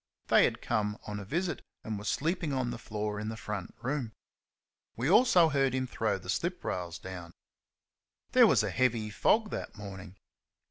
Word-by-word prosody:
They - - +7
had - - -2
come 105 0 0
on 105 0 -4
a 100 - -7
visit, 170 - -2 0.2
and 110 -2 -4
were 105 - -9
sleeping 160 - 0
on 130 -2 0
the - - -6
floor 105 -2 -3
in 105 +1 -3
the 110 - -5
front 105 -5 -5
room. 130 -4 -2 0.8
We 125 +3 -1
also 185 -3 +6
heard 135 -3 +2
him 130 0 0
throw 110 -5 -1
the 95 - -13
slip 175 - -1
rails 85 -2 -3
down. 90 -2 -8 1.0
There - - +7
was - - +4
a - - -1
heavy 115 -4 +1
fog 215 - +2
that - - -5
morning. 95 -2 -9
110 Hz, 180 wpm, -30 LUFS, 105-140 Hz, 1.0 s, They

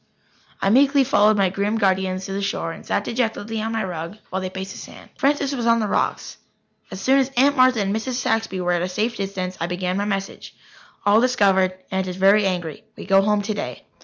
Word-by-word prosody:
I 195 - +3
meekly 275 +3 +5
followed 215 -5 +3
my 195 -2 +2
grim 200 +3 -1
guardians 190 -2 0
to 195 - -5
the 200 - -2
shore 195 -4 -2
and - - -10
sat 200 - -1
dejectedly 225 -2 -2
on 225 +1 -3
my 225 -1 -1
rug 175 +1 -6
while 190 +1 -2
they 185 - -3
paced 190 +1 -6
the - - -9
sand. - - -12
Francis 280 0 +1
was 240 -3 -2
on 230 0 +4
the 220 - 0
rocks. 205 - -2 0.5
As 190 - -7
soon 265 +7 +3
as 265 -1 +1
Aunt 280 +3 +4
Martha 255 -4 +4
and 200 +1 -1
Mrs. 240 +4 -3
Saxby 225 -5 -1
were 180 0 0
at 175 -1 +1
a 180 - -2
safe 215 +6 -1
distance, 190 -2 -4
I 170 - 0
began 180 +1 -2
my 200 - -1
message: 195 -1 -4 0.5
"All 205 +2 +5
discovered. 195 -7 +2
Aunt 190 0 -1
is 180 - -4
very 195 +2 +4
angry. 180 +1 -4
We - - -8
go 195 0 +4
home 210 0 +1
today." 210 0 -4
200 Hz, 220 wpm, -22 LUFS, 190-225 Hz, 0.5 s, meekly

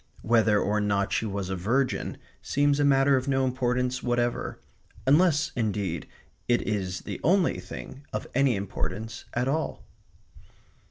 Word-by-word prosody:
Whether 110 -2 +4
or 105 +1 +1
not 100 -1 0
she 110 - 0
was 100 -2 -3
a - - 0
virgin 120 +9 0 0.2
seems 145 0 +2
a - - +3
matter 135 -1 +4
of 130 +1 -3
no 135 -1 +2
importance 125 0 0
whatever. 120 0 -1 0.5
Unless, 155 +2 +4
indeed, 100 -8 -2 0.4
it 120 0 +2
is 95 -4 -2
the - - -6
only 180 +3 +3
thing 135 +2 -9
of - - -3
any 135 -2 +3
importance 100 +3 -4
at 125 +2 +1
all. 155 +4 -2
120 Hz, 145 wpm, -27 LUFS, 105-135 Hz, 0.5 s, Whether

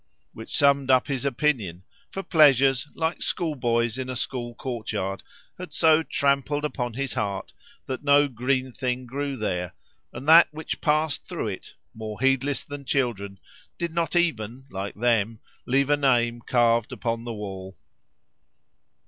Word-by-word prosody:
Which 110 - -5
summed 140 -2 +3
up 130 -1 +5
his 135 -2 -3
opinion; 120 - 0 0.3
for 195 - -5
pleasures, 140 -6 +4
like 160 +1 -2
schoolboys 120 - 0
in 130 0 -4
a 130 - -3
school 120 -1 -4
courtyard, 105 -7 -4 0.4
had 180 - -8
so 160 -1 +5
trampled 140 -1 0
upon 120 -5 -3
his 140 0 -3
heart 100 -2 -3 0.3
that 130 +1 -5
no 145 0 +5
green 130 +1 -1
thing 125 0 -3
grew 140 +2 -4
there, 90 -5 -3 0.4
and 130 +4 -8
that 165 +2 +9
which 155 +1 -6
passed 155 -1 0
through - - -3
it, - - -8 0.2
more 110 -1 -7
heedless 135 +2 +1
than 145 -1 -8
children, 110 -8 -1 0.4
did 170 -1 -3
not 170 -1 -1
even, 130 -7 0
like 95 +1 -5
them, 115 -1 +1 0.3
leave 135 +3 +2
a 145 - +4
name 120 -4 +2
carved 115 -2 +3
upon 115 -1 -3
the 120 -1 -5
wall. 95 -2 -7
130 Hz, 150 wpm, -25 LUFS, 115-145 Hz, 0.4 s, that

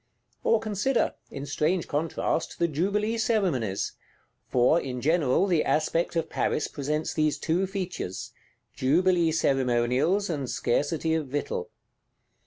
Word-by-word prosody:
Or 230 - +4
consider, 220 +4 0 0.2
in 140 - -6
strange 155 +5 0
contrast, 160 +2 -1
the 170 - +2
jubilee 205 +8 0
Ceremonies; 175 - 0 0.6
for, 125 +7 +4
in 125 -4 -4
general, 155 +3 +2
the 175 -5 +2
aspect 165 +3 0
of 165 - 0
Paris 150 - -1
presents 150 +2 -2
these 155 -2 +1
two 175 +4 0
features: 185 - -4 0.4
jubilee 170 +4 +3
ceremonials 135 +6 +2
and 140 -7 -3
scarcity 160 +5 0
of 160 -3 -1
victual. 145 +2 -3
160 Hz, 120 wpm, -27 LUFS, 140-185 Hz, 0.6 s, Or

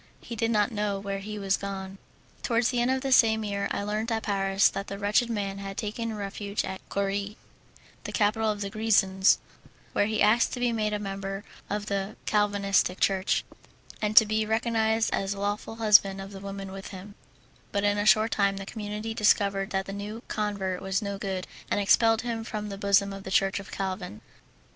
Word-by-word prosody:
He 235 - -7
did 225 +1 0
not 210 0 +2
know 210 -2 -1
where 195 0 -4
he 210 +2 -6
was 195 -1 +1
gone. 195 -1 -6 0.4
Towards 235 0 +2
the 245 -2 +1
end 240 - +2
of 260 0 +1
the 270 0 -2
same 220 -3 +5
year 200 -1 -2
I - - -2
learnt 215 +3 -2
at 225 -1 -1
Paris 195 -1 +3
that 195 - -4
the 200 - -5
wretched 210 +4 +2
man 200 -3 -2
had 195 0 -6
taken 220 +1 -3
refuge 200 0 -3
at 190 - -6
Coire, 200 +1 -2 0.7
the - - -4
capital 220 +1 +1
of 210 -1 -2
the 200 -1 -3
Grisons, 200 -3 +3 0.6
where 205 - +2
he 215 0 -1
asked 220 +3 +4
to 250 - -4
be 245 -1 +1
made 215 -2 0
a - - +1
member 195 -1 -5 0.3
of 205 0 -2
the 200 0 -2
Calvinistic 200 -3 +2
Church, 190 0 +1 0.6
and 210 0 -1
to 220 - +11
be 215 +1 0
recognized 220 0 +1
as 195 +1 -1
lawful 205 +2 -3
husband 205 -3 +5
of 195 +1 -7
the 195 - -8
woman 195 -1 -6
with 195 0 -8
him; 200 +1 -9 0.6
but 200 0 0
in 205 0 +2
a 205 - 0
short 215 +1 +5
time 200 -1 +2
the 195 - -6
community 210 +1 -5
discovered 200 -2 +2
that 190 0 -1
the 195 - -6
new 210 +4 -6
convert 200 -3 -2
was 190 +1 -1
no 200 -1 -4
good, 190 -2 -3 0.2
and - - +1
expelled 225 +3 +4
him 230 -2 -3
from 210 -2 -5
the 200 - -5
bosom 200 0 +3
of 195 - -7
the 190 - -6
Church 195 +1 +2
of 200 - -10
Calvin. 185 - -4
205 Hz, 200 wpm, -27 LUFS, 195-220 Hz, 0.7 s, to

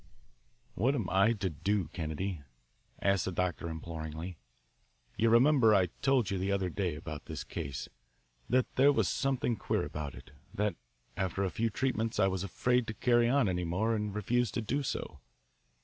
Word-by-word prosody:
"What 130 +8 +1
am 110 -9 -1
I 100 +5 +4
to 100 -4 -2
do, 95 +4 0
Kennedy?" 85 +1 -3 0.6
asked 100 -2 +3
the - - -2
doctor 90 -1 -1
imploringly. 80 +1 -6 0.8
"You 115 +2 +3
remember 120 -2 +6
I 90 -3 +3
told 130 -7 +2
you 95 - -1
the 95 +2 0
other 95 -2 0
day 90 -3 -1
about 75 -1 -7
this - - -5
case 65 -1 -5 0.6
that 130 0 +1
there 140 +2 +7
was 140 - +2
something 135 -3 0
queer - - 0
about 75 -2 -5
it, - - -13 0.2
that 105 -3 0 0.4
after 95 0 -1
a 95 - -1
few 115 +1 0
treatments 115 -1 -1
I 95 - +5
was 95 -1 0
afraid 125 +5 +1
to 110 - -4
carry 120 -1 +3
on 135 -3 +3
any 90 -1 0
more 95 +7 0
and 105 -1 -2
refused 120 +3 0
to 120 - 0
do 135 +7 0
so? 75 - -4
100 Hz, 175 wpm, -31 LUFS, 90-115 Hz, 0.8 s, there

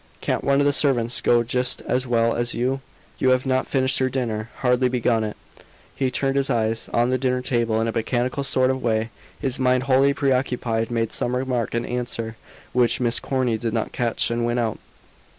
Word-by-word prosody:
"Can't - - -1
one 140 0 +3
of 145 - +3
the 145 - +3
servants 125 -5 +2
go 120 -1 +3
just 125 +1 0
as 130 0 -1
well 115 -1 +2
as 120 0 -1
you? 130 +3 -1 0.4
You 130 - +3
have 130 +1 +2
not 130 0 0
finished 130 0 +1
your 130 0 +1
dinner; 115 -4 -3
hardly 125 0 +2
begun 120 -2 +1
it." 105 -1 -5 0.6
He 135 -2 0
turned 135 +2 -1
his 140 0 +1
eyes 115 -1 0
on 120 +1 +2
the 130 - +1
dinner 125 -1 0
table 115 -3 +1
in 115 - 0
a - - 0
mechanical 120 +4 -1
sort 130 -1 +2
of 130 0 -3
way, 110 -1 0 0.3
his 130 -1 -1
mind 130 0 +2
wholly 135 +1 +3
preoccupied, 125 -4 0
made 115 -2 -1
some 120 +1 0
remark 125 -3 -1
in 120 0 -1
answer, 120 -2 -4 0.4
which 120 -2 +2
Miss 120 -1 +2
Corny 125 -4 -1
did 115 -1 -2
not 115 -2 -1
catch, 120 -1 -1
and 120 0 -1
went 120 +1 0
out. 115 -3 -1
125 Hz, 205 wpm, -23 LUFS, 115-130 Hz, 0.6 s, one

